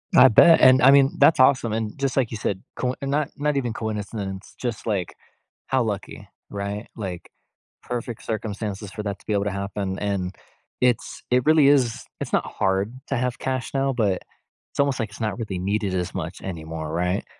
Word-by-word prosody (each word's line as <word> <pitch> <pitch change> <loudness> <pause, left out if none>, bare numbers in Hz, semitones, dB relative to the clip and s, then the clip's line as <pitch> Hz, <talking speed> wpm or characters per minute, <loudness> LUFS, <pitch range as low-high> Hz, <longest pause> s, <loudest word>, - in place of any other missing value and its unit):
I 130 - +9
bet. 160 +9 +7
And, 130 0 +7
I 130 +3 +8
mean, 140 0 +5
that's 160 - +6
awesome. 130 -4 +4
And 110 -1 -3
just 135 -2 -1
like 130 -4 +1
you 115 - -4
said, 100 -2 -2
coin 125 0 -1
not 140 +1 0
not 150 -1 0
even 120 -4 -1
coincidence, 105 -3 -5
just, 120 -4 -4
like, 95 -6 -1 0.5
how 130 -2 +2
lucky, 105 -3 -5 0.2
right? 100 +2 -4
Like, 95 -5 -6 0.5
perfect 120 -2 -5
circumstances 105 -2 -4
for 105 - -6
that 100 -1 -4
to - - -22
be 105 - -1
able 100 -1 +1
to 105 - 0
happen. 100 -1 -3
And 100 -3 -2 0.5
it's 125 -2 0
it 125 0 +4
really 155 -2 +6
is 130 -5 +2 0.2
it's - - -4
not - - +2
hard 95 +3 0
to 135 - -1
have 125 0 -1
cash 130 -2 -3
now, 135 0 +1
but 105 -7 +1 0.5
it's - - -13
almost 140 -2 +2
like 110 - -2
it's 100 - -11
not 110 -1 -1
really 105 -5 -3
needed 100 +1 -1
as 90 0 -2
much 90 -1 -5
anymore, 80 -3 -5
right? 90 +3 0
110 Hz, 195 wpm, -24 LUFS, 100-130 Hz, 0.5 s, I